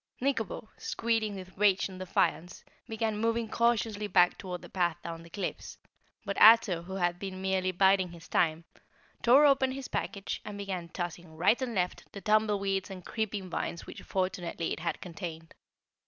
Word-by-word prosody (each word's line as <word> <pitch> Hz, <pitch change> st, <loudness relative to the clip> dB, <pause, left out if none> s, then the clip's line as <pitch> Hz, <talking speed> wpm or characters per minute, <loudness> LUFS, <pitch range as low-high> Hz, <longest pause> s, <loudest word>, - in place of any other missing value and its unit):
Nikobo, 235 Hz, -6 st, -1 dB
squealing 225 Hz, -3 st, -1 dB
with 185 Hz, -1 st, -9 dB
rage 200 Hz, -2 st, +4 dB
and 185 Hz, -1 st, -10 dB
defiance, 180 Hz, -2 st, -1 dB, 0.3 s
began 220 Hz, -1 st, -1 dB
moving 230 Hz, +1 st, 0 dB
cautiously 225 Hz, -2 st, +1 dB
back 180 Hz, -2 st, +4 dB
toward 180 Hz, -2 st, -6 dB
the -, -, -9 dB
path 175 Hz, -3 st, 0 dB
down 165 Hz, -1 st, -6 dB
the 170 Hz, -, -14 dB
cliffs, 200 Hz, +4 st, -5 dB, 0.5 s
but 200 Hz, 0 st, -2 dB
Ato, 215 Hz, -6 st, +7 dB
who 190 Hz, +3 st, -7 dB
had 175 Hz, -2 st, 0 dB
been 190 Hz, -1 st, -5 dB
merely 190 Hz, -1 st, 0 dB
biding 190 Hz, 0 st, +3 dB
his 170 Hz, -1 st, -12 dB
time, 165 Hz, 0 st, +1 dB, 0.6 s
tore 265 Hz, +5 st, +7 dB
open 270 Hz, -2 st, +4 dB
his 270 Hz, -1 st, -6 dB
package 200 Hz, -2 st, -3 dB
and 210 Hz, -1 st, -7 dB
began 190 Hz, -4 st, -4 dB
tossing 175 Hz, -1 st, -6 dB
right 215 Hz, +9 st, +3 dB
and 245 Hz, -3 st, -2 dB
left 180 Hz, -1 st, -2 dB
the 200 Hz, -, -6 dB
tumbleweeds 205 Hz, -3 st, +1 dB
and 185 Hz, -2 st, -9 dB
creeping 210 Hz, -4 st, -3 dB
vines 170 Hz, -1 st, -4 dB
which -, -, -9 dB
fortunately 185 Hz, -3 st, -2 dB
it -, -, -6 dB
had 170 Hz, 0 st, -3 dB
contained. 165 Hz, -2 st, -7 dB
190 Hz, 170 wpm, -30 LUFS, 175-220 Hz, 0.6 s, Ato